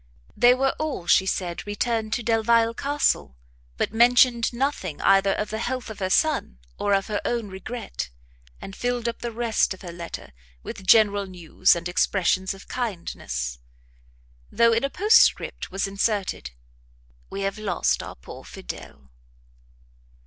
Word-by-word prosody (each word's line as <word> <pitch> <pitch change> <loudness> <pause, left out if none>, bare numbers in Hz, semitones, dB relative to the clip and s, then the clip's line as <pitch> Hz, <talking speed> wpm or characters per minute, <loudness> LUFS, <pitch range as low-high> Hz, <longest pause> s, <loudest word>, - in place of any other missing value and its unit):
They 245 +1 +6
were 270 +1 +1
all, 305 - -3
she 190 +2 +4
said, 180 0 -3
returned 220 +1 -1
to 240 - -1
Delvile 230 0 +3
Castle, 255 - 0 0.4
but - - -1
mentioned 240 0 +4
nothing 255 - -2
either 195 0 +4
of 210 - -3
the 220 - -3
health 250 -1 -3
of 215 - -10
her 185 -1 -1
son, 285 - +1 0.2
or 205 - +1
of 195 - 0
her 210 -2 -2
own 235 -4 -2
regret, 195 - -6 0.5
and 195 - -9
filled 245 -1 -2
up 235 - -3
the 235 - -4
rest 225 -4 0
of 190 - -17
her 175 - -6
letter, 170 - -8 0.3
with 190 - -8
general 205 -2 +5
news 175 -2 +2
and 170 0 -4
expressions 190 +1 +1
of 195 - -14
kindness; 65 - -4 0.9
though, 230 0 +4
in 230 +3 +1
a 275 - +1
postscript, 420 +9 +3
was 195 +1 -1
inserted, 200 - -1 0.8
"We 195 - -5
have 195 +2 -2
lost 200 -4 0
our - - -8
poor 60 - -11
Fidel." 65 +2 -10
210 Hz, 150 wpm, -24 LUFS, 185-235 Hz, 0.9 s, They